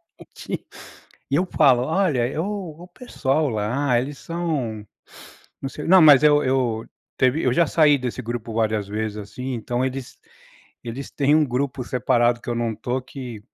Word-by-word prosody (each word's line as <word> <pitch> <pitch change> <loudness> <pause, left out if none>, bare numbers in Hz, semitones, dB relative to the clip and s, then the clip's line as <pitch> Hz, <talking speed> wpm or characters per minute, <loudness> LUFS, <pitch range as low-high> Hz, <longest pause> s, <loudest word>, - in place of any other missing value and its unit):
diretamente. - - -9 0.6
E - - 0
eu 180 +4 +1
falo: 135 -8 +4
"Olha, 150 -5 0
o 180 -5 -5
o - - -15
pessoal 155 - -1
lá, 120 +4 0
eles 135 +2 -6
são 145 -11 -3 0.8
não 135 - -2
sei" 150 - -7
não 190 -1 +7
mas 145 -3 +8
eu 150 -1 +5
eu 125 -4 0 0.3
teve 130 +5 +2
eu 125 - +3
já 170 +6 +3
saí 150 -3 +4
desse 125 -1 -4
grupo 115 -1 -5
várias 110 -2 0
vezes, 105 0 -3
assim, 125 +6 -6
então 120 +2 -2
eles 130 -1 -5 0.7
eles 120 +4 -6
têm 145 +1 +2
um 155 - +4
grupo 130 0 -2
separado 120 -1 +1
que - - -6
eu - - -1
não 115 -2 -1
tô 125 +4 -2
que 125 -4 -8
130 Hz, 170 wpm, -22 LUFS, 120-150 Hz, 0.8 s, mas